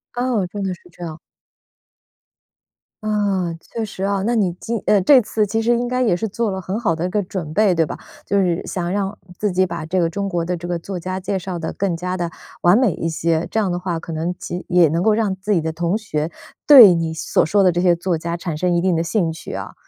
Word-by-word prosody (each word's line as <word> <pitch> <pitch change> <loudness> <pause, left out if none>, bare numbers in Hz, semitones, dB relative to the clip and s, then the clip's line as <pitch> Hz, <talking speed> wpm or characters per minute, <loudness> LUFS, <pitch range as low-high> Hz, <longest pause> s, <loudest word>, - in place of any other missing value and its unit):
哦， 245 -5 0
真 200 +2 -5
的 190 -1 -1
是 - - -24
这 175 - -11
样。 160 -2 -6 1.9
啊， 200 -5 0
确 230 - -6
实 205 -3 -7
啊。 195 -1 0
那 235 - +1
你 200 -7 +1
今 230 -2 -3
呃， 205 -2 +4
这 265 +8 +7
次 215 0 0
其 225 +2 -1
实 235 +2 +2
应 240 0 +1
该 250 0 0
也 225 -8 +3
是 220 - -2
做 220 +1 -1
了 190 -1 -3
很 190 +4 -3
好 200 -9 +1
的 165 +2 -2
一 180 - -1
个 205 +2 0
准 175 -4 -5
备 205 -1 +3
对 165 -1 +3
吧？ - - -6 0.3
就 200 - +1
是， 175 -3 0
想 175 -2 -3
让 200 +1 -2 0.2
自 210 -2 0
己 185 +1 +2
把 170 -3 -5
这 180 +3 0
个 165 -1 +2
中 200 +3 -3
国 170 -3 -1
的 180 +1 -1
这 175 0 -7
个 175 -1 -1
作 185 +2 -6
家 185 +2 -4
介 195 +1 -2
绍 180 -1 -5
得 160 - -4
更 185 -4 -1
加 180 +1 -3
地 175 -2 -3 0.3
完 175 +4 +5
美 245 -7 +3
一 165 - -3
些， 165 0 0
这 220 - +1
样 200 - +1
的 175 - -1
话 175 -2 -3
可 165 - -7
能 165 +3 -2
及 175 +1 -6
也 175 -2 +5
能 165 +4 0
够 220 - +4
让 210 -3 0
自 195 +3 -4
己 185 - +4
的 160 0 -3
同 170 +5 0
学， 160 -7 -3 0.3
对 245 -10 +10
你 165 -1 -1
所 160 - +1
说 200 +5 +2
的 180 -3 +4
这 175 - 0
些 180 -1 +4
作 170 0 -1
家 170 +2 -4
产 170 -3 -4
生 180 +2 +1
一 175 - +2
定 180 0 +1
的 165 - +1
兴 170 0 0
趣 160 - -9
啊。 - - -6
185 Hz, 280 characters per minute, -20 LUFS, 170-205 Hz, 1.9 s, 对